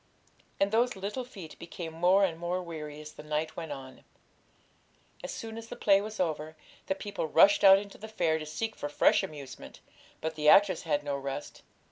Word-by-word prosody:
And 195 0 +2
those 240 +2 +2
little 205 +7 -4
feet 195 -10 -11
became 170 -1 -7
more 180 +4 +4
and 165 -3 -4
more 175 +1 -1
weary 150 -3 -7
as 155 0 -10
the - - -10
night 150 +1 -3
went 165 -3 -6
on. 135 -2 -9 1.2
As - - -5
soon 225 0 -6
as 225 - -10
the - - -7
play 195 -1 +4
was 215 +1 -7
over, 155 -3 -2 0.3
the 190 - 0
people 200 -4 -4
rushed 195 +6 +5
out 195 -1 +9
into 200 0 -7
the 220 - -8
fair 170 -7 0
to 155 - -6
seek 220 +8 -3
for 145 - -5
fresh - - +4
amusement; 140 -4 -9 0.4
but 160 0 -3
the 150 -1 +2
actors 195 -2 +6
had 145 -1 +1
no 145 -1 -2
rest. 140 +1 -6
170 Hz, 195 wpm, -30 LUFS, 150-200 Hz, 1.2 s, out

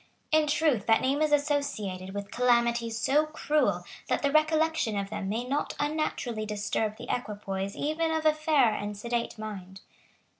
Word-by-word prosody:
In 310 -1 +4
truth 295 -8 +1
that 225 -1 +5
name 275 +3 +1
is 305 -1 +2
associated 215 -11 -1
with 200 0 -5
calamities 235 -2 +2
so 295 +7 +2
cruel 305 -1 0 0.2
that - - 0
the 280 - +2
recollection 310 -6 +2
of 200 0 -3
them 195 -2 -3
may 225 +4 -1
not 275 +4 -2
unnaturally 290 -7 -1
disturb 210 +1 -2
the - - -9
equipoise 200 -4 -4
even 310 +3 -1
of 320 0 -1
a 310 - +6
fair 300 -7 +3
and 205 0 -4
sedate 235 +2 -2
mind. 195 -3 -7
240 Hz, 160 wpm, -28 LUFS, 210-305 Hz, 0.2 s, a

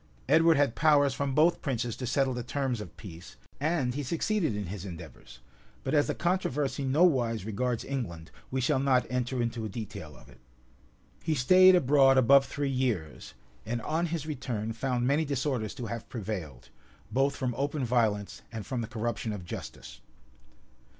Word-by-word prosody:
Edward 165 -1 +5
had 140 -5 +2
powers 145 -2 +4
from 135 0 -2
both 165 +3 +4
princes 120 -5 -2
to 125 - -4
settle 135 +1 +1
the 125 - -3
terms 130 -2 -2
of - - -10
peace, 85 -3 -11 0.2
and 145 -5 0
he 145 - -3
succeeded 165 - 0
in 105 -1 -3
his 95 +1 -6
endeavors; 85 -8 -10 0.4
but 130 - -2
as 145 -1 +3
the - - -1
controversy 150 -6 -1
nowise 130 - +2
regards 115 +2 -2
England, 85 -13 -5 0.2
we 130 - -2
shall 130 +1 +2
not 130 -2 +3
enter 125 0 -1
into 115 -1 -3
a 110 - -3
detail 100 - -7
of - - -17
it. 65 - -18 0.8
He 160 - 0
staid 185 +8 +7
abroad 135 -4 +5
above 135 +2 +6
three 145 0 -2
years; 115 - -2 0.3
and 120 +2 -3
on 165 +3 0
his 160 -3 -3
return 120 -7 -3
found 125 +1 -1
many 140 +5 +2
disorders 135 -6 -2
to 120 - -5
have 115 0 -6
prevailed, 95 - -6 0.4
both 135 +2 +1
from 125 -2 -2
open 140 +1 -1
violence 110 -4 0
and 110 -3 -6
from 125 -3 -3
the 115 - -4
corruption 115 0 -3
of 100 -4 -6
justice. - - -8
125 Hz, 170 wpm, -29 LUFS, 110-140 Hz, 0.8 s, staid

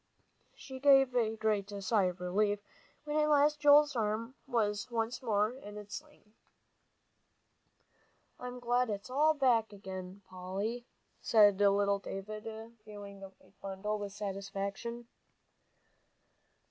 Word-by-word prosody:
She 265 -1 -9
gave 270 -2 +5
a 225 -2 +1
great 215 -2 0
sigh 205 -1 +2
of 180 0 -3
relief, 205 +3 +1 0.5
when 300 0 -2
at 305 0 +3
last 295 0 +4
Joel's 295 -1 +6
arm 225 +2 -1
was 220 -2 -1
once 230 +1 -2
more 215 -3 +1
in 210 -5 -10
its 210 +5 -7
sling. 295 -8 -16 2.1
"I'm 250 0 -7
glad 245 0 +1
it's 205 +4 -5
all 305 +4 +3
back 240 -6 +2
again, 190 -1 -8
Polly," 195 +7 -4 0.3
said 205 -3 +5
little 200 0 +3
David, 210 +3 -7 0.4
viewing 205 -2 -10
the 195 0 -9
white 190 0 -27
bundle 200 +2 -3
with 205 -1 -5
satisfaction. 200 +3 -5
215 Hz, 120 wpm, -32 LUFS, 200-250 Hz, 2.1 s, Joel's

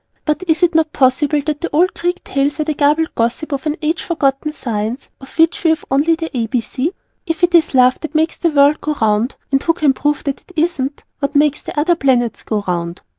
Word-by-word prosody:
But 305 +3 0
is 320 +2 +2
it 350 0 +4
not 320 -1 +1
possible 285 +3 +2
that 300 -1 -2
the 340 - -2
old 350 +5 +2
Greek 355 +1 -2
tales 280 +1 -1
were 305 - -1
the 310 - -1
garbled 300 +2 +1
gossip 235 +7 -1
of 280 +2 -3
an 300 - 0
age 320 +3 0
forgotten 290 -2 -1
science 230 -3 -4
of 270 +3 -14
which 330 +5 +3
we 330 - +4
have 320 - 0
only 295 +5 +3
the 325 -3 -6
A.B.C.? 250 +5 -1 0.4
If 325 +1 -3
it 350 0 +3
is 330 -5 +3
Love 255 0 +4
that 315 - -7
makes 320 +1 +1
the 340 - +1
world 290 0 +4
go 305 0 -2
round 220 +3 +1 0.2
(and 270 0 +2
who 330 - +2
can 295 -4 +2
prove 295 +2 -1
that 280 -1 -3
it 365 - -20
isn't?), 305 -4 -1 0.2
what 285 0 -2
makes 295 0 +2
the - - -4
other 335 +4 +3
Planets 255 -6 +1
go 210 -2 -2
round? 170 -1 -3
295 Hz, 225 wpm, -17 LUFS, 265-320 Hz, 0.4 s, it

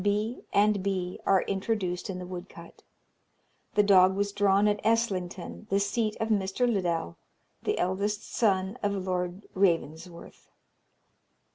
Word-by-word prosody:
V. 210 +4 0
B. - - -16
and 205 0 +3
B., 185 -2 -2
are 190 -2 +4
introduced 195 -3 -2
in 185 - -3
the 180 - -6
woodcut. 180 +1 -10 0.9
The 210 - +5
dog 190 -2 +6
was 200 +1 0
drawn 200 0 +3
at 210 0 0
Eslington, 210 -3 -1
the 195 - +2
seat 215 +1 -1
of 220 - -1
Mr. 205 +3 +1
Liddell, 175 - -1 0.4
the - - -1
eldest 200 +3 -1
son 195 0 0
of 205 -1 0
Lord 185 0 -3
Ravensworth. 170 -2 -2
195 Hz, 135 wpm, -28 LUFS, 185-210 Hz, 0.9 s, dog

